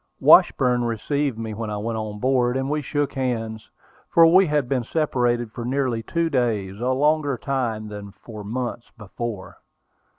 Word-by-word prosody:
Washburn 125 -1 +5
received 120 +3 -1
me 110 -1 -5
when 110 +1 -5
I 105 - -3
went 115 +2 -3
on 105 -1 -5
board, 125 +1 +1
and 135 +1 -2
we 150 0 0
shook 145 0 -2
hands, 115 -5 -3 0.4
for 165 - +6
we 185 +3 +6
had 150 -4 0
been 130 -1 0
separated 120 -5 0
for 120 - -6
nearly 125 -2 -1
two 170 +9 -1
days, 110 -9 -1
a 125 +2 -1
longer 145 +1 +1
time 115 -5 -2
than 105 -1 -8
for 105 +1 -11
months 120 +2 -4
before. 105 -1 -6
120 Hz, 165 wpm, -23 LUFS, 110-135 Hz, 0.4 s, for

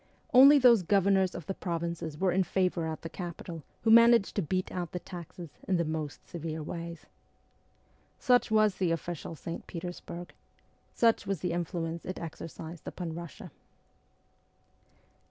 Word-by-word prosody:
Only 275 +4 +9
those 245 -6 +6
governors 195 0 +2
of 175 - -7
the 195 - -3
provinces 170 -4 -4
were 185 +2 +2
in 190 +2 +2
favour 180 -2 0
at 160 -1 -5
the - - -3
capital 170 -2 -7 0.2
who 220 - +4
managed 230 -2 +6
to 200 - +1
beat 185 +3 -2
out 175 -3 -4
the - - -2
taxes 175 -2 -9 0.2
in 185 - +2
the 170 - +1
most 155 -2 -5
severe 160 -2 -5
ways. 170 +1 -7 1.1
Such 250 -2 +3
was 215 -2 +3
the 185 -3 +1
official 165 0 -4
St. 165 +4 -7
Petersburg. 175 0 -7 0.6
Such 230 -1 +3
was 195 -5 -2
the 180 - -1
influence 170 -1 -3
it 185 - -5
exercised 165 0 -8
upon 170 -3 -5
Russia. 170 -3 -8
175 Hz, 150 wpm, -30 LUFS, 165-195 Hz, 1.1 s, Only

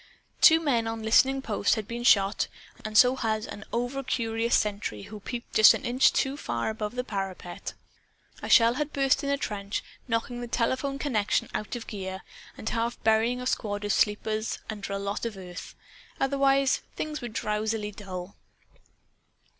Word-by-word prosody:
Two 320 0 +8
men 250 -8 +1
on 225 0 -4
listening 265 +5 +4
post 210 -2 +1
had 215 -3 -4
been 235 +2 -5
shot; 200 -4 +4 0.4
and 215 0 -1
so 250 +2 +7
had 220 -4 -1
an 205 - -8
overcurious 235 -2 -1
sentry 200 - -1
who 215 0 -9
peeped 235 +3 -7
just 215 0 +8
an - - -6
inch 250 +2 +4
too 270 +1 0
far 120 - -2
above 215 +2 -5
a 250 - 0
parapet. 195 -5 -5 0.7
A - - -5
shell 230 0 +6
had 295 +3 -3
burst 275 0 +2
in 280 - -1
a 280 - +2
trench, 205 -5 -3 0.2
knocking 240 +1 -2
the 240 - -5
telephone 260 +4 -1
connection 235 -8 0
out 210 - -3
of 235 - -6
gear 190 -2 -6 0.3
and - - -8
half 235 +1 -2
burying 225 +3 +3
a 250 - -5
squad 205 -4 -2
of 205 - +1
sleepers 215 +1 0
under 205 -2 -6
a 200 - -1
lot 200 +1 -3
of 230 -4 -3
earth. 180 -1 -9 0.4
Otherwise, 275 0 +2
things 305 -1 -4
were 240 - -4
drowsily 215 -1 -2
dull. 190 -2 -8
225 Hz, 170 wpm, -27 LUFS, 210-250 Hz, 0.7 s, Two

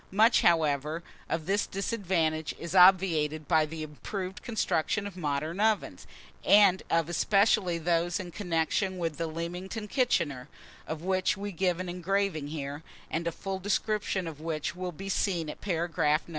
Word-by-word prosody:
Much, 220 +5 +4
however, 155 -1 +2 0.3
of 165 -1 -2
this 200 +3 +1
disadvantage 180 -7 -1
is 170 +1 -6
obviated 170 -5 +5
by 160 -2 +3
the 160 0 -6
improved 185 +6 -6
construction 215 -3 0
of 200 -3 -7
modern 155 +1 -2
ovens, 215 -1 0 0.4
and 200 -2 +6
of 165 -1 +2
especially 190 +1 +2
those 170 +2 0
in 180 -2 -6
connection 180 +1 -1
with 165 -4 -2
the 165 - -2
Leamington 180 +6 -5
kitchener, 170 - 0 0.4
of 160 0 -5
which 185 0 +1
we 205 +1 -4
give 180 -1 0
an 185 - -4
engraving 180 -3 -1
here, 145 -1 -5 0.3
and 165 +1 -1
a - - 0
full 195 +2 -5
description 205 -1 -1
of 155 -2 -7
which 160 0 -3
will 180 0 -4
be 195 +4 -8
seen 180 -4 0
at - - -13
paragraph 165 -4 +1
No. - - -14
175 Hz, 155 wpm, -29 LUFS, 160-195 Hz, 0.4 s, and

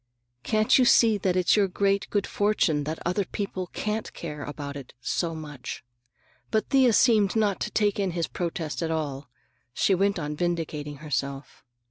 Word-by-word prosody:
Can't 215 - +3
you - - +6
see 225 -3 +5
that 185 -2 0
it's 185 -1 +4
your 205 -2 +3
great 200 +1 0
good 205 -1 0
fortune 180 -8 +1
that 155 +2 -3
other 180 +4 +1
people 185 -1 -4
can't 215 +4 -3
care 150 -3 -6
about 145 -1 -6
it 140 -3 -9
so 165 +6 -2
much?" 145 -5 -7 0.7
But 220 -1 0
Thea 265 -3 +5
seemed 215 -4 +4
not 210 -3 +1
to - - -2
take 205 -1 +1
in 195 -2 +1
his 165 - +1
protest 165 -2 -4
at 165 - -1
all. 145 -4 -3 0.5
She 195 - +3
went 195 +2 +2
on 150 -2 -3
vindicating 155 -3 -2
herself. 140 -1 -4
180 Hz, 170 wpm, -26 LUFS, 150-205 Hz, 0.7 s, you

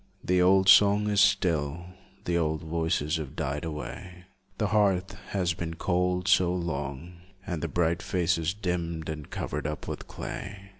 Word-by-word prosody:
The 90 0 +2
old 95 +1 +4
song 100 +1 +6
is 100 -1 +4
still, 85 -5 +2 0.4
The 85 - 0
old 80 -2 0
voices 80 -1 0
have 75 -4 -6
died 70 +3 -2
away, 85 +3 -7 0.3
The 105 -2 0
hearth 95 -3 +2 0.2
has 90 -3 0
been 80 0 -5
cold 90 +1 0
so 90 -1 +4
long, 85 -1 -4 0.3
And 85 -4 -3
the - - -1
bright 85 0 0
faces 85 -2 0
dimmed 85 -5 -3
and 75 -2 -6
covered - - -3
up 75 0 -5
with - - -6
clay. 100 0 -7
85 Hz, 155 wpm, -28 LUFS, 80-95 Hz, 0.4 s, song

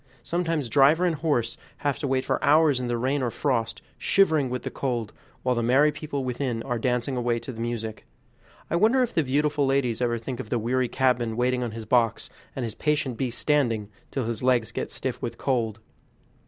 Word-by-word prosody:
Sometimes 165 -4 -1
driver 145 +8 +5
and 175 - +2
horse 140 -8 0 0.2
have 145 -2 -1
to 145 - -2
wait 130 0 0
for - - -1
hours 150 -2 +5
in 125 - -3
the 120 0 0
rain 130 +4 0
or 125 - 0
frost, 115 -2 -1 0.2
shivering 160 -9 +3
with 125 -1 -3
the - - -4
cold, 120 -5 -2 0.3
while 125 - +2
the 120 - 0
merry 135 +6 +4
people 150 -2 -4
within 125 -2 -2
are 120 -3 -2
dancing 125 +2 0
away 120 -1 0
to 125 - -6
the 115 -2 -7
music. 115 -2 -4 0.6
I 170 - 0
wonder 230 +7 +4
if 245 - -3
the 160 - +2
beautiful 145 +2 +1
ladies 130 -4 +1
ever 120 -1 +1
think 120 +2 -6
of 110 - -6
the 120 - +1
weary 125 +3 0
cabman 120 -4 +1
waiting 125 +1 +1
on 120 - -1
his 110 0 -7
box, 115 -2 +1 0.2
and 130 - -2
his 110 - -5
patient 150 -2 0
beast 120 -1 -3
standing, 120 -9 +1 0.2
till 135 - -2
his 115 -1 -3
legs 125 -4 +2
get - - -4
stiff - - -4
with - - -4
cold. 115 -5 -1
125 Hz, 210 wpm, -26 LUFS, 115-145 Hz, 0.6 s, driver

